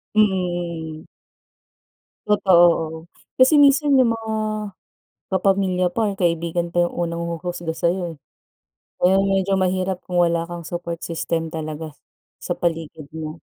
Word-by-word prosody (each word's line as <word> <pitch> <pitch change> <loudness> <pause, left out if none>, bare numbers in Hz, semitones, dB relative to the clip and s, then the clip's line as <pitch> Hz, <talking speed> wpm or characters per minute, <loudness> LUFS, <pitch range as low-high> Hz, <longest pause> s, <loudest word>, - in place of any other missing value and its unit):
Mm, 175 -5 0
mm. - - -22 1.2
Totoo 190 -4 +4 0.2
oo, 160 0 -4 0.4
kasi 265 +4 +6
minsan 285 0 +5
yung 250 -3 +4
mga 225 -1 -3 0.9
kapamilya 190 -1 +1
pa, 205 -1 -1
kaibigan 170 -1 -1
pa, 175 0 +2
yung - - -10
unang 170 -1 -2
huhusga 170 -1 -4
sayo, 175 -1 -1
eh. - - -25 0.8
Ngayon 190 +2 +4
medyo 195 0 +1
mahirap 185 0 -1
kung 180 -1 -1
wala 170 -1 +2
kang 170 -1 -8
support 170 -1 -5
system 165 0 -2
talaga, 155 -1 -6 0.5
sa - - -4
paligid 165 -4 -3
mo. 155 0 -6
175 Hz, 130 wpm, -22 LUFS, 165-190 Hz, 1.2 s, kasi